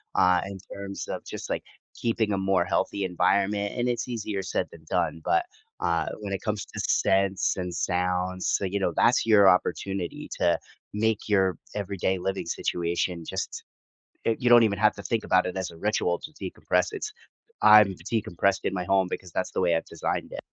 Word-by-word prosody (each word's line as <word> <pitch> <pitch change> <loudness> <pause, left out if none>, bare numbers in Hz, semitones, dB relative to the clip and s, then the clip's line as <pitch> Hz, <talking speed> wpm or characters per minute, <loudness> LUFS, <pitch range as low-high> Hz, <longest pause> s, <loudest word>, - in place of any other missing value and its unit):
uh, 90 -1 +5
in 100 0 -7
terms 100 0 -6
of - - -5
just, - - -7
like, - - -2 0.3
keeping 115 -2 0
a - - 0
more 95 -2 +2
healthy 100 +2 0
environment, 100 +3 +1
and 125 0 +1
it's 120 +1 -2
easier 110 -5 -3
said - - -1
than 80 -1 -14
done, 80 - 0
but, 370 - +2 0.3
uh, - - +1 0.2
when 100 -1 -4
it 95 - -3
comes 105 -2 -2
to - - -12
scents 95 0 +2
and 90 -1 -3
sounds, 90 +1 -1
so - - +1
you 100 +2 -1
know, 90 - +1
that's 120 - +4
your 105 -3 +6
opportunity 90 0 -1
to - - +3 0.4
make 110 0 0
your 95 -4 +3 0.2
everyday 95 -2 -1
living 95 +2 -2
situation 85 0 -2
just - - -4 0.6
y 115 - +3
you 125 - +1
don't 120 -1 +9
even 100 -3 +1
have 105 0 +4
to 100 - -9
think 115 +1 -1
about 95 - +3
it 90 - -4
as 95 -1 -3
a 85 - -13
ritual 90 -2 0
to 155 - -10
decompress. - - -1
It's 425 0 -4 0.5
I'm 105 -3 +8 0.2
decompressed 100 -3 +1
in - - 0
my 90 -1 -2
home 95 0 +3
because 90 -2 -5
that's - - -2
the - - -1
way 85 - +3
I've 80 - -2
designed - - -3
it. - - -5
95 Hz, 195 wpm, -26 LUFS, 90-105 Hz, 0.6 s, don't